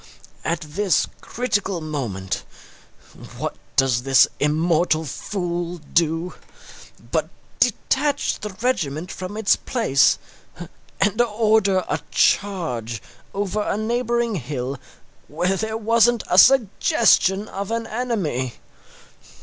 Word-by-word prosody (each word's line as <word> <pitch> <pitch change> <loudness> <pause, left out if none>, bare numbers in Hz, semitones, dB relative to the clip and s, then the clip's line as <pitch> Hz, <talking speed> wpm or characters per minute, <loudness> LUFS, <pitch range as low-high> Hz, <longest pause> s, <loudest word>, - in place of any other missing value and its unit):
At 170 +1 -1
this 175 +5 +1 0.2
critical 205 -6 -1
moment, 120 - -4 0.9
what - - -3 0.2
does 130 -3 +3
this 135 0 +5
immortal 160 +2 +2
fool 175 +2 -4
do 165 +2 0 0.8
but - - 0 0.3
detach 290 -1 +1
the 210 - -5
regiment 170 - -1
from 185 +3 -6
its 220 -2 +3
place 225 - +2 0.8
and 210 +4 +2
order 215 -4 +2
a 145 - -1
charge 125 - 0 0.3
over 205 +1 -2
a 205 - -1
neighbouring 235 +1 0
hill 135 -2 -4 0.5
where 175 +6 0
there 220 +3 -2
wasn't 230 +1 +3
a 180 - +6
suggestion 215 - +4
of 200 -1 -5
an 230 0 -2
enemy! 200 - -2
185 Hz, 100 wpm, -22 LUFS, 155-220 Hz, 0.9 s, a